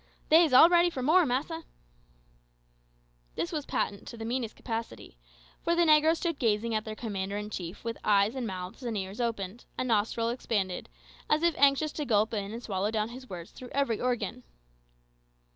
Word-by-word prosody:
"They's 320 -1 +6
all 260 +6 +9
ready 345 0 +4
for 260 -7 -5
more, 325 +4 +5
massa." 305 +6 -2 1.7
This 170 - -2
was 300 -2 -4
patent 200 -1 -2
to 235 - -8
the 225 - -6
meanest 235 -1 -2
capacity; 225 - -6 0.4
for 340 - +1
the 345 0 +4
negroes 310 +1 +5
stood 335 -4 -2
gazing 225 -1 +1
at 215 -1 -1
their 215 -1 -5
commander 200 -3 -3
in 210 +1 -5
chief 175 -1 -6
with 230 0 -4
eyes 205 +1 +3
and 260 -3 -3
mouths 185 +3 -6
and 235 -4 -3
ears 195 +4 -4
open, 225 -2 -3 0.2
and 255 - -1
nostrils 230 +1 +1
expanded, 200 -7 -2 0.4
as 305 +2 +2
if 340 -1 +4
anxious 280 +2 +3
to 300 - -4
gulp 220 -2 +2
in 205 -2 -3
and 235 +2 -7
swallow 195 0 -1
down 215 0 -1
his 255 +2 -10
words 175 -2 -8
through 250 - -11
every 275 -6 +1
organ. 250 -1 -1
230 Hz, 180 wpm, -29 LUFS, 210-280 Hz, 1.7 s, all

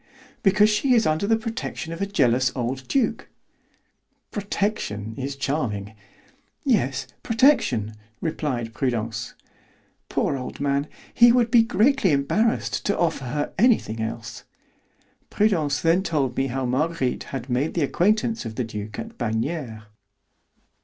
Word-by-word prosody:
"Because 210 0 +4
she 245 +5 +3
is 225 - +3
under 155 +6 +1
the 225 +1 +3
protection 225 -7 -5
of 165 - -7
a 200 - 0
jealous 130 -8 +2
old 130 +1 -3
duke." 235 -5 0 1.0
"'Protection' 195 - -2
is 135 +3 -4
charming." 120 -8 -2 0.7
"Yes, 205 - +1 0.2
protection," 225 - +3 0.3
replied 130 -8 -3
Prudence. 115 -3 -2 0.7
"Poor - - 0
old 125 -2 -6
man, 140 +1 0 0.3
he 240 0 +7
would 235 -1 +2
be 235 - +7
greatly 230 - +3
embarrassed 210 - +1
to 200 - +1
offer 160 -6 0
her 145 +4 -3
anything 210 - +3
else." 110 0 -5 0.9
Prudence 165 -9 +1
then 165 +3 +3
told 140 -9 -1
me 135 - 0
how 130 +1 -2
Marguerite 135 +1 -1
had 130 -2 -6
made 130 +4 -1
the 170 - +2
acquaintance 215 - +1
of 110 -2 -6
the 125 - -1
duke 105 -1 -6
at 225 0 -7
Bagnères. 115 0 -2
145 Hz, 130 wpm, -24 LUFS, -, 1.0 s, he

